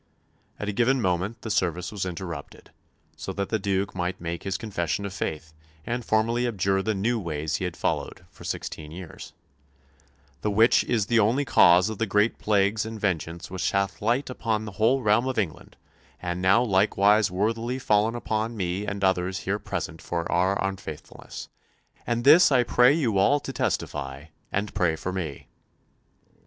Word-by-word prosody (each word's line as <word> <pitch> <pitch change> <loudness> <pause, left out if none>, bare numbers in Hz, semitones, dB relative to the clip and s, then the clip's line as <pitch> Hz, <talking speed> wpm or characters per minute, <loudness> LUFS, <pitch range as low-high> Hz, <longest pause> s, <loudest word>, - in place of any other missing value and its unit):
At 105 - -5
a - - 0
given 125 +6 +2
moment 95 +3 -1
the 110 - -3
service 90 -3 0
was 100 -3 -3
interrupted, 85 -4 -7 0.4
so - - -6
that 100 -1 -3
the 110 - 0
Duke 100 0 -1
might 90 +1 -3
make 85 0 -4
his 95 -1 -2
confession 95 -3 -2
of 100 - -5
faith 80 -4 -4 0.3
and 120 +1 -2
formally 115 +3 +1
abjure 95 -3 +1
the 110 +2 -1
new 115 +5 0
ways 80 -4 -2
he 95 - -3
had 90 -1 -5
followed 90 - -2
for - - -15
sixteen 75 -1 -5
years, 85 0 -9 1.1
"the 105 - 0
which 110 +3 +4
is 110 -4 +1
the 115 +2 +3
only 120 +7 +2
cause 90 -6 +6
of 110 -2 -5
the 115 - 0
great 105 +4 +2
plagues 105 0 +2
and 110 0 -6
vengeance 85 -3 -2
which 95 - -1
hath 100 0 -1
light 120 +6 +1
upon 110 -3 -2
the 105 - -6
whole 115 +7 +2
realm 110 +4 +3
of 130 - -2
England, 95 -8 -3 0.4
and 90 0 -3
now 95 +6 +4
likewise 105 0 +3
worthily 115 +6 -1
fallen 110 -2 +2
upon 110 -1 -2
me 95 +2 -2
and 100 -1 -3
others 95 -1 +1
here 100 +2 -1
present 80 -4 -5
for 85 -1 -3
our 95 +3 +2
unfaithfulness;... 95 -6 -7 0.6
and 120 0 0
this 150 +4 +7
I 125 -2 +5
pray 125 +2 +5
you 125 -10 +1
all 145 +9 +4
to - - -6
testify, 65 +2 -3 0.3
and 100 +1 -2
pray 90 -5 +1
for 90 +3 -4
me." 80 -8 -5
100 Hz, 175 wpm, -26 LUFS, 90-110 Hz, 1.1 s, this